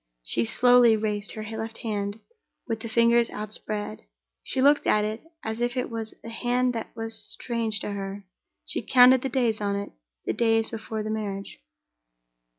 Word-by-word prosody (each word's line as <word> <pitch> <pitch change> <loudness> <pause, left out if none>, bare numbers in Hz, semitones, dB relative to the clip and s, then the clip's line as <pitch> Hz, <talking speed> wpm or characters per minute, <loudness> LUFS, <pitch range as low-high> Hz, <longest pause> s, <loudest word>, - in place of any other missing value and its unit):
She 115 - 0
slowly 245 - +6
raised 210 -1 -2
her 215 - -6
left 225 +1 -5
hand, 205 -1 -2 0.5
with 225 -2 -2
the 230 0 -6
fingers 235 +1 +4
outspread; 215 0 -5 0.4
she 265 - -4
looked 285 +2 +4
at 210 0 +3
it 215 +2 -4 0.2
as 220 +1 -4
if 240 +1 0
it 250 - -2
was 225 -1 -5
a 230 - -7
hand 245 +2 0
that 225 -1 -4
was 225 0 -5
strange 230 -3 -1
to - - -3
her; 200 0 -5 0.4
she - - -2
counted 255 0 +6
the 270 - -2
days 235 -4 +1
on 200 -1 0
it, 200 0 -4 0.3
the - - 0
days 225 -1 +2
before 220 -1 -4
the 215 - -3
marriage. 200 - -4
225 Hz, 170 wpm, -26 LUFS, 210-235 Hz, 0.5 s, slowly